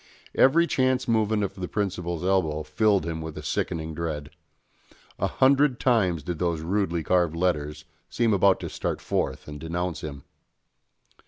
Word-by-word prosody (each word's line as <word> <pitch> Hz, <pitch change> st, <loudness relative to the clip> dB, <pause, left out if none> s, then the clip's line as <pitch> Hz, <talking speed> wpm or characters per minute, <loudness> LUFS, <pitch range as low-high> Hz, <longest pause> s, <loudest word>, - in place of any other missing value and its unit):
Every 165 Hz, +6 st, +5 dB
chance 130 Hz, -4 st, +1 dB
movement 110 Hz, -2 st, +2 dB
of 100 Hz, -, -2 dB
the 95 Hz, -2 st, -5 dB
principal's 90 Hz, -5 st, -2 dB
elbow 80 Hz, -5 st, +1 dB
filled 100 Hz, 0 st, +2 dB
him 80 Hz, -1 st, -3 dB
with 80 Hz, -1 st, -7 dB
a -, -, -6 dB
sickening 80 Hz, -2 st, -2 dB
dread. 75 Hz, -3 st, -4 dB, 0.9 s
A -, -, +1 dB
hundred 135 Hz, -1 st, +3 dB
times 95 Hz, -, +2 dB
did 85 Hz, 0 st, -4 dB
those 85 Hz, -3 st, 0 dB
rudely 85 Hz, -1 st, -1 dB
carved 85 Hz, -2 st, +2 dB
letters 75 Hz, -4 st, -1 dB, 0.2 s
seem 115 Hz, -2 st, +1 dB
about 100 Hz, -1 st, +4 dB
to -, -, -4 dB
start -, -, -3 dB
forth -, -, -2 dB
and 75 Hz, 0 st, -7 dB
denounce 85 Hz, +2 st, -3 dB
him. 70 Hz, -3 st, -7 dB
90 Hz, 155 wpm, -26 LUFS, 80-105 Hz, 0.9 s, Every